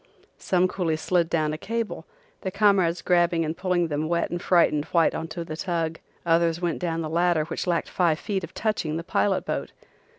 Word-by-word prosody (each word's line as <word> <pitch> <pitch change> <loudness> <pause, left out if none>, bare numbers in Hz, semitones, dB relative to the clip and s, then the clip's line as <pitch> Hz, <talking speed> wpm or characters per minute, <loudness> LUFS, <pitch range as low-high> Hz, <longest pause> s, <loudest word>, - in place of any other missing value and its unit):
Some 185 0 +2
coolies 165 -4 -1
slid 170 0 +1
down 155 -2 0
a 155 - -5
cable, 205 -5 -4 0.3
their 190 - -3
comrades 195 -4 +3
grabbing 175 -2 +2
and 155 +1 -3
pulling 180 -1 0
them 155 +1 -2
wet 170 0 0
and 175 0 -3
frightened 150 -4 +3
white 165 -2 +2
on 165 - -4
to 165 +1 -6
the 155 - -5
tug. 165 -2 -2 0.3
Others 165 0 +2
went 175 -2 -1
down 165 -2 -2
the 160 - -3
ladder 170 -1 +2
which 170 - -4
lacked 170 -2 0
five 170 -4 +2
feet 195 +1 -3
of 170 - -9
touching 190 -8 -1
the 165 - -4
pilot 190 +2 0
boat. - - -3
170 Hz, 200 wpm, -25 LUFS, 160-180 Hz, 0.3 s, comrades